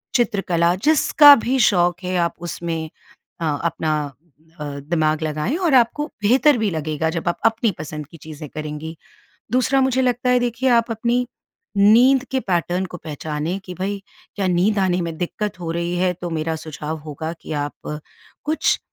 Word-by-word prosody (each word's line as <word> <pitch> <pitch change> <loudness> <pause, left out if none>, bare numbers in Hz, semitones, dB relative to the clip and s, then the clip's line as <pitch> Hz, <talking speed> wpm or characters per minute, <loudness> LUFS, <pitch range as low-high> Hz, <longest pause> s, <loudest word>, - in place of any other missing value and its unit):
चित्रकला 190 -8 +2
जिसका 295 -1 +8
भी 260 +2 +1
शौक़ 175 0 +1
है 180 0 -1
आप - - -12 0.2
उसमें 165 -2 -4 0.5
अ, - - 0 0.2
अपना 160 -2 0 0.7
अ, - - -3 0.2
दिमाग 155 -2 +1
लगाएँ 155 - -1
और 350 -5 +1
आपको 255 +5 +3 0.2
बेहतर 265 +6 +4
भी 220 -2 +1
लगेगा, 155 0 -2
जब 165 +1 -4
आप 175 - -3
अपनी 225 0 +2
पसंद 150 -1 -6
की 165 - -14
चीज़ें 155 -1 -9
करेंगी। 155 +2 -6 0.6
दूसरा 255 +2 +3
मुझे 260 0 +2
लगता 250 0 +1
है 250 - +5
देखिए, 245 +2 0
आप 235 0 +3
अपनी 240 +2 0 0.5
नींद 240 +6 +6
के 265 - +1
पैटर्न 180 -2 -1
को 180 - -8
पहचानें 155 +3 -4
कि 180 - -7
भई, 195 +2 -3 0.3
क्या 195 -2 0
नींद 185 +4 +2
आने 185 -2 +1
में 165 -1 -4
दिक्कत 195 +3 -3
हो 165 -2 -4
रही 170 +1 -2
है? 180 0 +2
तो 175 0 -6
मेरा 160 0 -2
सुझाव 155 0 -6
होगा 155 +2 -5
कि - - -7
आप 145 0 -4 0.5
कुछ 310 +1 +1
180 Hz, 170 wpm, -21 LUFS, 160-235 Hz, 0.7 s, जिसका